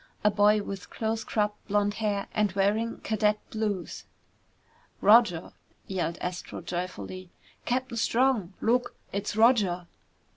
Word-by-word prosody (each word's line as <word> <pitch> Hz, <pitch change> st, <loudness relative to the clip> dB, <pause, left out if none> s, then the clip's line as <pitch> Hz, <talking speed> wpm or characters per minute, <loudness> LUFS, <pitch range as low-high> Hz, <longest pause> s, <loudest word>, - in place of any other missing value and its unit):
A 210 Hz, -, +5 dB
boy 205 Hz, +1 st, +4 dB
with 195 Hz, -2 st, -7 dB
close 225 Hz, 0 st, -2 dB
cropped 210 Hz, -1 st, -2 dB
blond 205 Hz, 0 st, +1 dB
hair 205 Hz, -2 st, 0 dB
and 210 Hz, -2 st, +2 dB
wearing 210 Hz, +4 st, 0 dB
cadet 210 Hz, -1 st, +1 dB
blues. 210 Hz, -4 st, -3 dB, 0.9 s
"Roger!" 210 Hz, -6 st, +5 dB, 0.3 s
yelled 175 Hz, -3 st, -2 dB
Astro 180 Hz, 0 st, -5 dB
joyfully. 180 Hz, +1 st, -5 dB, 0.4 s
"Captain 250 Hz, -1 st, -1 dB
Strong, 230 Hz, -5 st, +2 dB
look! 245 Hz, +2 st, +1 dB, 0.2 s
It's 200 Hz, +1 st, -2 dB
Roger!" 210 Hz, -6 st, +3 dB
210 Hz, 115 wpm, -28 LUFS, 190-225 Hz, 0.9 s, A